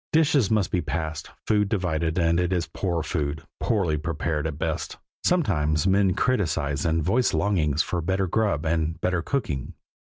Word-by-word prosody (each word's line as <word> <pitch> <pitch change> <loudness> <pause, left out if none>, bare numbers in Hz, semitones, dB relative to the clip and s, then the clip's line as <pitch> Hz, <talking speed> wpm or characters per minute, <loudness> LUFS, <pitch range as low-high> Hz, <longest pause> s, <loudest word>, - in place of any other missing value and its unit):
Dishes 145 -8 +3
must 105 -4 +1
be 90 - +1
passed, 80 -2 -4 0.2
food 105 -2 +2
divided, 85 -5 -1
and 85 -1 +3
it 90 0 0
is 90 -2 +1
poor 85 -4 -2
food, 75 -2 -2 0.2
poorly 90 -9 +1
prepared 75 -1 -2
at 75 -2 -5
best. - - -3 0.3
Sometimes 75 - +2
men 95 -1 +3
criticize 80 - 0
and 80 0 +1
voice 120 +9 +2
longings 80 -8 +1
for 90 - -2
better 95 +3 0
grub 95 -5 0
and 80 0 0
better 90 -1 0
cooking. 80 - -3
85 Hz, 160 wpm, -25 LUFS, 80-100 Hz, 0.3 s, Dishes